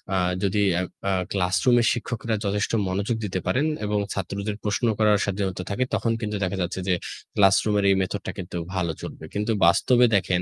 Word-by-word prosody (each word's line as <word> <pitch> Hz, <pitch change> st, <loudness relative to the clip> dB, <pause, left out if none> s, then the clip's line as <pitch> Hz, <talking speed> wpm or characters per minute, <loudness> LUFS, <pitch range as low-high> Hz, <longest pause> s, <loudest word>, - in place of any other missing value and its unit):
আ -, -, +2 dB, 0.3 s
যদি 100 Hz, +1 st, +1 dB
অ্যা 90 Hz, -, +1 dB, 0.3 s
আ -, -, +2 dB, 0.2 s
ক্লাসরুমের 100 Hz, +6 st, +3 dB
শিক্ষকরা 115 Hz, -1 st, -3 dB
যথেষ্ট 100 Hz, +2 st, 0 dB, 0.2 s
মনোযোগ 100 Hz, +5 st, -1 dB
দিতে 95 Hz, -2 st, -2 dB
পারেন 140 Hz, +5 st, +2 dB, 0.2 s
এবং 105 Hz, 0 st, 0 dB
ছাত্রদের 100 Hz, +2 st, -3 dB
প্রশ্ন 105 Hz, +4 st, 0 dB
করার 105 Hz, -1 st, +5 dB
স্বাধীনতা 95 Hz, -2 st, -2 dB
থাকে 125 Hz, +6 st, 0 dB
তখন 115 Hz, -, +1 dB
কিন্তু 105 Hz, -1 st, -2 dB
দেখা 95 Hz, +1 st, -1 dB
যাচ্ছে 90 Hz, +2 st, -2 dB
যে 90 Hz, -, +3 dB, 0.4 s
ক্লাসরুমের 100 Hz, +1 st, +4 dB
এই 95 Hz, -, +5 dB
মেথড 100 Hz, +2 st, -2 dB
টা -, -, -2 dB
কিন্তু 90 Hz, -1 st, -5 dB, 0.2 s
ভালো 90 Hz, -3 st, 0 dB
চলবে। -, -, -8 dB
কিন্তু 105 Hz, +2 st, -1 dB
বাস্তবে 120 Hz, +8 st, +5 dB
দেখেন 90 Hz, -2 st, +1 dB
100 Hz, 180 wpm, -24 LUFS, 95-105 Hz, 0.4 s, করার